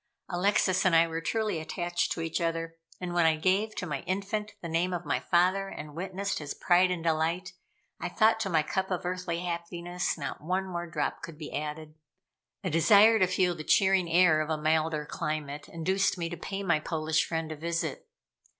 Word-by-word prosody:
Alexis 185 0 +2
and 185 -3 +4
I 165 0 +6
were 165 0 -4
truly 210 0 -1
attached 175 +2 -2
to 165 - -5
each 165 +2 -2
other, 165 0 -2 0.2
and 180 -1 -4
when 175 -2 +4
I 160 - +4
gave 190 +7 +1
to - - -3
my 150 -5 -3
infant 205 +3 -2
the 175 - -6
name 170 +3 0
of 175 -1 -4
my - - 0
father 185 +3 +2
and 150 -5 -8
witnessed 190 +4 -3
his 145 -2 -5
pride 180 +1 +4
and 180 -2 -2
delight, 165 +3 0 0.5
I 175 - -3
thought 220 +4 +3
to 205 - -1
my 160 -3 +3
cup 190 +4 -2
of 180 -2 -2
earthly 180 -1 -2
happiness, 175 0 -3
not 145 - -5
one 185 +5 -1
more 175 -2 -5
drop - - -2
could 165 -2 -8
be 155 -2 -8
added. 155 +1 -5 0.7
A 185 - -2
desire 210 +7 +6
to 185 - +4
feel 185 -1 +2
the 155 -2 -7
cheering 190 -3 +3
air 165 -2 +5
of 155 - -3
a 160 - 0
milder 155 0 +1
climate 150 -1 -4
induced 190 +4 0
me 170 -1 -2
to 175 - -5
pay 195 +3 -5
my 170 -5 +2
Polish 155 0 0
friend 160 -1 -3
a - - -4
visit. 170 - -3
175 Hz, 200 wpm, -29 LUFS, 160-185 Hz, 0.7 s, I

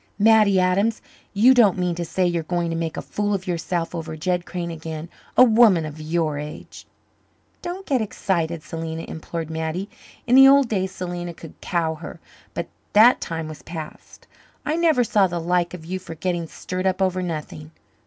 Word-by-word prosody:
"Mattie 210 -2 +5
Adams! 195 +5 +2 0.3
You 230 +6 +6
don't 220 -8 +5
mean 180 -1 0
to 175 +1 -3
say 180 +2 0
you're 175 -1 0
going 170 +1 -2
to - - -2
make 165 -1 -3
a - - -4
fool 205 0 -1
of 190 -1 -5
yourself 170 -1 -2
over 160 -2 -5
Jed 180 +2 -1
Crane 175 -2 -4
again? 160 0 -7 0.3
A - - +9
woman 220 -8 +5
of 155 0 -8
your 155 -2 -1
age!" 150 +1 -9 0.7
"Don't 360 +2 -6
get 265 -4 +1
excited, 170 -6 -2
Selena," 165 0 -5
implored 160 0 -6
Mattie. 160 +5 -3 0.3
In 245 - 0
the 270 +1 +9
old 275 -1 +6
days 190 -3 -1
Selena 175 -2 -5
could 165 - -11
cow 165 -2 0
her, 160 +1 -9 0.4
but - - -3 0.3
that 225 +4 +6
time 165 -1 -4
was 155 -1 -9
past. 160 -2 -9 0.4
"I 305 - 0
never 325 -7 +3
saw 205 -4 +3
the 175 -1 -3
like 175 +1 0
of 160 -3 -11
you 185 +2 -4
for 175 -3 -9
getting 175 0 -2
stirred 185 +3 -4
up 185 0 0
over 185 -1 +1
nothing." 155 -3 -5
175 Hz, 185 wpm, -23 LUFS, 165-200 Hz, 0.7 s, A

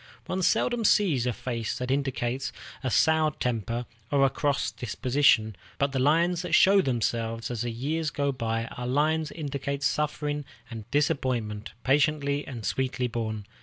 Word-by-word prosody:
One 185 +1 -2
seldom 240 +6 +2
sees 170 - +3
a - - +2
face 115 -1 -3
that 125 +1 -3
indicates 135 -1 -1 0.3
a 130 - 0
soured 155 +3 +3
temper 120 0 -2 0.2
or 140 -1 +4
a 135 - +2
cross 145 -1 0
disposition, 125 -2 +2 0.2
but 140 0 +1
the 135 - -1
lines 165 +6 +3
that 175 -2 +1
show 195 +1 +6
themselves 115 - -1
as 120 -2 -3
the 120 - -1
years 150 +7 -2
go 140 -1 0
by 115 -3 -2
are 125 +1 -6
lines 155 +4 +1
that - - -12
indicate 140 -1 -3
suffering 150 0 -1 0.3
and 110 -1 -8
disappointment, 125 -7 -1
patiently 145 +1 +1
and 120 -6 -6
sweetly 130 +4 -1
borne. 110 -3 -3
135 Hz, 160 wpm, -27 LUFS, 120-150 Hz, 0.3 s, show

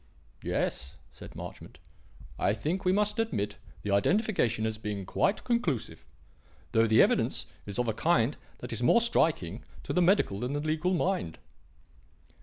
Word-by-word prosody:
"Yes," 70 +1 -2 0.2
said - - -12
Marchmont; - - -9 0.6
"I 100 - +2
think 165 - -2
we 180 - +4
must 210 +3 +1
admit 105 - -1 0.3
the 105 - -2
identification 115 - +2
as 110 -1 -2
being 105 -3 -4
quite 195 - 0
conclusive, 185 - -1 0.7
though 115 0 +4
the 110 0 +6
evidence - - +1 0.2
is 100 - -4
of 125 -1 0
a 110 - +1
kind 140 -1 +2 0.3
that 125 -1 -5
is 115 - -3
more 125 - +5
striking 140 - +1 0.2
to - - -3
the 180 - +3
medical 175 - +3
than 125 +4 -2
to - - 0
the 150 - -4
legal 160 +4 +1
mind." 175 - -1
125 Hz, 160 wpm, -29 LUFS, -, 0.7 s, the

